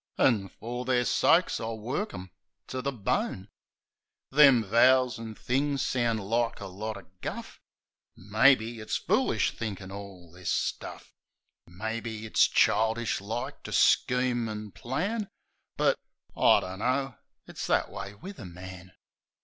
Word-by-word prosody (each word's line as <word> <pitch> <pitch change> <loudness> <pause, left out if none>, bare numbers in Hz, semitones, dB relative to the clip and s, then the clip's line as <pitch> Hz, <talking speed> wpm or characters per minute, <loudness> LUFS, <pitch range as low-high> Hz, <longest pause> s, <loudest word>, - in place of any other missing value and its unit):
An' 105 -7 +3
fer 120 +2 -6
their 125 -1 +1
sakes 170 +8 +3
I'll 115 0 -4
work 135 - -3
'em 90 0 -9 0.4
to 130 - -3
the 140 - -1
bone." 100 -4 -2 0.8
Them 135 -4 +7
vows 125 +4 +4
an' 110 -1 -7
things 140 +4 0
sounds 120 -3 0
like 115 +4 0
a 100 - -6
lot 105 +3 -5
o' 95 - -12 0.2
guff. - - -6 0.6
Maybe, 115 +3 +3
it's 110 - -2
foolish - - +1
thinkin' 100 -4 -6
all 95 -4 -10
this 90 0 -6
stuff - - -3 0.3
— - - -58 0.2
Maybe, 110 +4 -5
it's 110 - +4
childish 110 0 +2
like 110 +4 -5
to - - -8
scheme 125 -2 +3
an' 105 -1 -6
plan; 180 - -3 0.5
But - - +2 0.3
— - - -34
I - - +5
dunno 125 +7 -2
— - - -54
it's - - -6
that - - +1
way 100 +3 -7
wiv 190 - -10
a 110 - -8
man. 95 +1 -10
115 Hz, 145 wpm, -28 LUFS, 100-125 Hz, 0.8 s, Them